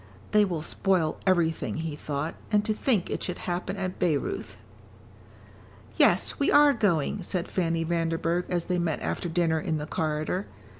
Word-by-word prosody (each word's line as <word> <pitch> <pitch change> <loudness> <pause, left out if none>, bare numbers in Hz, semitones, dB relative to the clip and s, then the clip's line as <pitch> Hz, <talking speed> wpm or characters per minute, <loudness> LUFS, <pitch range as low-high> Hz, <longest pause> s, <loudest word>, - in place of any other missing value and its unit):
"They 210 0 +5
will 170 -5 -3
spoil 175 -3 +1
everything," 170 -4 +1
he 160 -2 -3
thought. 150 +1 -3 0.2
"And 210 -1 +3
to 215 - +1
think 215 -4 0
it - - -2
should 180 - -3
happen 180 +2 -3
at 185 -1 -4
Bayreuth." 155 -5 -1 1.4
"Yes, - - +3
we 280 - +2
are 290 0 +7
going," 195 - +1
said 180 -1 -3
Fanny 165 -2 0
Vanderburgh 165 +1 0
as 175 -2 0
they 180 0 -1
met 165 -3 -1
after 175 - -2
dinner 165 -1 +1
in 155 0 -1
the 150 - -4
corridor. 155 +5 -2
170 Hz, 160 wpm, -27 LUFS, 160-190 Hz, 1.4 s, are